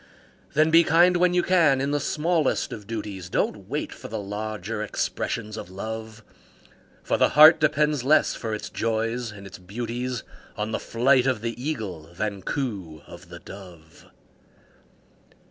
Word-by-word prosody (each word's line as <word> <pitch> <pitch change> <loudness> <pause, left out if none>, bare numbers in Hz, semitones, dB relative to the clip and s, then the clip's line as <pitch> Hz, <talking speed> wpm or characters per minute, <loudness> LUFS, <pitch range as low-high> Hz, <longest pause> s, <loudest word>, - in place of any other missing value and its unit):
Then 155 +2 +4
be 165 +1 +7
kind 175 +3 +5
when 180 0 +3
you 180 - +3
can 165 -7 +4
in 140 +1 -1
the 145 - +1
smallest 160 0 0
of 105 -3 -9
duties, 105 -5 -5
Don't - - -2
wait - - -3
for - - -10
the 110 - -5
larger 105 +1 -4
expressions 110 +1 -3
of - - -7
Love; 110 +3 -7 0.8
For - - 0
the - - +4
heart 155 +2 +9
depends 150 -2 +2
less 150 +4 +4
for 115 - -5
its 105 - -7
joys 115 +1 -2
and 100 -1 -11
its 95 - -10
beauties 120 +5 -4 0.3
On 105 +1 -2
the - - -1
flight 130 +2 +2
of 125 -5 0
the 115 0 -2
Eagle 95 - -4
than 100 0 -3
coo 95 - -4
of 85 +1 -13
the 85 - -9
Dove. 85 -3 -13
115 Hz, 160 wpm, -25 LUFS, 100-140 Hz, 0.8 s, heart